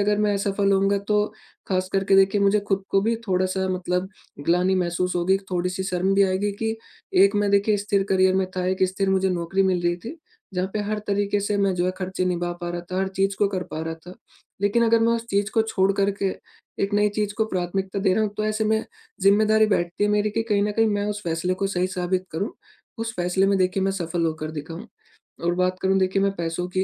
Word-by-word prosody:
अगर 205 +1 +2
मैं 210 -1 +2
असफल 200 0 +1
होऊँगा 195 +1 +2
तो 210 0 +3 0.4
ख़ास 185 -1 0
करके 195 0 +3
देखिए 195 +1 +4
मुझे 200 +1 +3
खुद 195 -1 +1
को 195 - +3
भी 225 +2 +1
थोड़ा-सा 185 0 0
मतलब 185 0 -1 0.4
ग्लानि 180 +2 +3
महसूस 180 0 -1
होगी। 175 +2 +2
एक 195 - -2
थोड़ी-सी 180 +1 -1
शर्म 190 0 0
भी 200 - +5
आएगी 190 +2 0
कि 220 0 -1 0.5
एक 200 +1 +2
मैं 205 0 +1
देखिए 200 +1 +3
स्थिर 200 -1 +1
करियर 190 0 +4
में 190 0 +1
था, 180 - -1
एक 190 +1 0
स्थिर 190 +1 -1
मुझे 190 0 +2
नौकरी 180 +2 0
मिल 185 -2 +1
रही 175 0 +1
थी। 230 - -9 0.4
जहाँ 185 +1 -1
पे 215 - 0
हर 210 +1 -2
तरीके 205 0 +1
से 205 +1 -1
मैं 195 -1 +2
जो 175 0 0
है - - +2
खर्चे 185 0 -2
निभा 175 -1 -1
पा 175 - -3
रहा 175 0 -3
था, 185 +2 -5
हर 190 - 0
चीज़ 195 +1 -1
को 205 - +3
कर 180 - -1
पा 155 - -3
रहा 165 0 -3
था। 180 - -9 0.5
लेकिन 220 +4 +3
अगर 230 0 +4
मैं 230 +1 +3
उस 230 0 -4
चीज 200 +1 +1
को 225 -1 +2
छोड़ 195 -3 +1
कर 200 0 +3
के - - +3 0.6
एक 200 +1 -3
नई 210 0 +3
चीज 210 -1 0
को - - +5
प्राथमिकता 190 0 -2
दे 190 -1 +3
रहा 220 - +2
हूँ 210 - -2
तो 215 - -1
ऐसे 215 0 0
में 220 +1 +1 0.4
जिम्मेदारी 215 +2 +4
बैठती 175 -2 0
है 205 - +2
मेरी 210 0 +1
कि 225 +2 -1
कहीं 200 -1 +3
न 210 - -1
कहीं 225 +2 +2
मैं 205 -1 0
उस 210 0 -3
फैसले 170 +2 -1
को - - +3
सही 185 -2 0
साबित 185 0 -1
करूँ, 195 +7 -2 0.5
उस 225 0 -3
फैसले 180 +2 +1
में 195 0 +2
देखिए 185 +1 +1
मैं 195 - +1
सफल 170 -2 -2
होकर 155 -1 -3
दिखाऊँ 160 +2 -7 0.6
और 175 - +2
बात 185 0 0
करूँ 190 0 +2
देखिए 190 +1 +1
मैं 200 - +2
पैसों 170 +1 -3
की, 185 +1 0
195 Hz, 240 wpm, -24 LUFS, 180-205 Hz, 0.6 s, भी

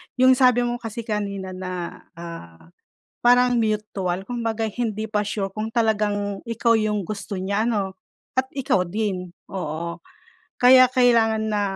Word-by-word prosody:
yung 255 0 +5
sabi 250 -2 +5
mo 240 0 -2
kasi 230 0 -6
kanina 200 -3 -3
na 185 -2 -6
,ah, 165 - -10 0.5
parang 245 0 +5
mutual 210 -4 -1
kumbaga 225 -2 -2
hindi 215 -1 -3
pa 210 -1 0
sure 200 -1 -2
kung 215 +2 -4
talagang 205 -3 0
ikaw 230 0 +2
yung 210 -1 0
gusto 200 +2 -6
niya 200 +3 0
ano? 200 -5 -1 0.4
At 260 - +3
ikaw 250 -9 +1
din, 185 -2 -3 0.2
oo. 170 -2 -4 0.6
Kaya 255 0 +7
kailangan 230 -3 +3
na 205 -1 +1
215 Hz, 140 wpm, -23 LUFS, 190-235 Hz, 0.6 s, Kaya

